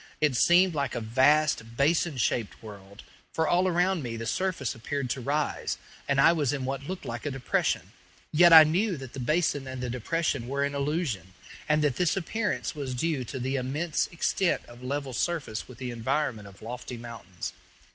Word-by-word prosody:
It 150 -4 +2
seemed 175 +7 +5
like 140 -4 -2
a - - -1
vast 130 0 +2
basin 155 +1 +2
shaped 115 -2 -1
world, 100 -1 -11 0.3
for 160 -1 0
all 180 +2 +3
around 180 0 +2
me 115 -3 -4
the 115 - -5
surface 175 -5 -1
appeared 130 +2 -3
to 130 - -3
rise, 145 +4 -1 0.3
and 140 -1 +2
I 140 - +7
was 145 -6 +1
in 135 -3 -3
what 135 +1 -4
looked 185 0 -5
like 115 0 -5
a - - -2
depression; 135 -2 -1 0.4
yet 170 +2 +6
I 160 -1 +12
knew 180 +4 +1
that 130 -2 -9
the 135 - -6
basin 145 0 0
and 130 0 -6
the 125 -1 -3
depression 135 0 -1
were 140 +2 -1
an 140 0 -1
illusion, 140 - -2 0.3
and 150 0 +3
that 140 -4 +1
this 180 0 +1
appearance 205 +4 -2
was 140 -4 -4
due 150 0 -1
to 130 - -6
the 130 +2 -1
immense 145 +5 -1
extent 175 +1 0
of 120 +1 -14
level 135 +1 -3
surface 140 -7 -2
with 125 - -12
the 125 -1 -5
environment 120 -2 -2
of 100 +1 -15
lofty 125 +1 -6
mountains. 115 -7 -7
140 Hz, 190 wpm, -28 LUFS, 120-160 Hz, 0.4 s, I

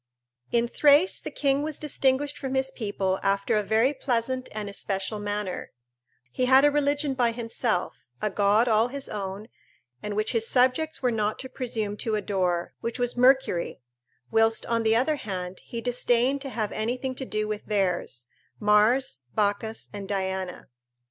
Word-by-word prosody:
In 235 0 +2
Thrace 290 +8 +4
the - - -6
king 275 -1 +1
was 305 0 -3
distinguished 285 -1 +1
from 270 -1 -4
his 265 0 +1
people 200 -6 -2
after 200 +2 +1
a 210 - +3
very 220 +7 +2
pleasant 255 -1 -1
and 210 -1 -5
especial 200 +1 -3
manner; 205 -2 -4 0.6
he 255 - 0
had 265 +2 +6
a 290 - +5
religion 290 0 +1
by 245 -3 +2
himself, 230 -4 -1 0.2
a 210 - -1
god 205 +4 +3
all 220 0 +4
his 275 +2 -4
own, 200 +1 -5 0.5
and 210 -1 -4
which 215 +1 0
his 225 -1 +2
subjects 265 +3 +2
were 250 - +3
not 215 -1 0
to 260 - -6
presume 225 -5 -3
to 220 0 -1
adore, 185 -4 -1
which 230 +1 -3
was 245 -1 0
Mercury, 250 -8 +3 0.5
whilst, 225 0 +3
on 230 -1 0
the 220 0 +3
other 270 +6 +2
hand, 185 -5 -5
he 235 - -5
disdained 245 +2 +1
to 275 - -5
have 220 -5 -2
anything 250 +4 -2
to 265 +1 -6
do 215 0 -2
with 210 0 -5
theirs, 180 - -1 0.3
Mars, 210 - +3
Bacchus, 215 +1 -1
and 200 -1 -6
Diana. 190 -2 -3
225 Hz, 165 wpm, -26 LUFS, 205-260 Hz, 0.6 s, had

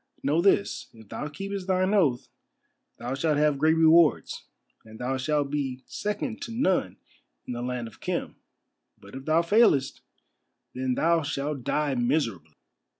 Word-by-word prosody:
"Know 150 +5 +2
this, 200 +1 +1
if 110 -2 -16
thou 150 - -5
keepest 195 +5 -6
thine 185 +1 +1
oath 150 -12 +2 0.7
thou 120 +2 -4
shalt 150 +2 0
have 150 -2 +2
great 160 +2 +4
rewards, 160 0 +3 0.4
and 110 0 -13
thou 125 +3 -2
shalt 145 +1 -1
be 135 -3 -3
second 210 +3 -4
to 235 - -6
none 190 - 0 0.5
in - - -5
the 120 - -5
land 125 -1 -3
of 115 - -15
Khem, - - -3 0.6
but - - -16
if 135 +1 -8
thou 160 +2 +3
failest, 170 - +3 0.7
then 130 0 -1
thou 170 +3 +2
shalt 145 -2 -3
die 150 +2 0
miserably." 120 - -1
150 Hz, 150 wpm, -26 LUFS, 130-170 Hz, 0.7 s, great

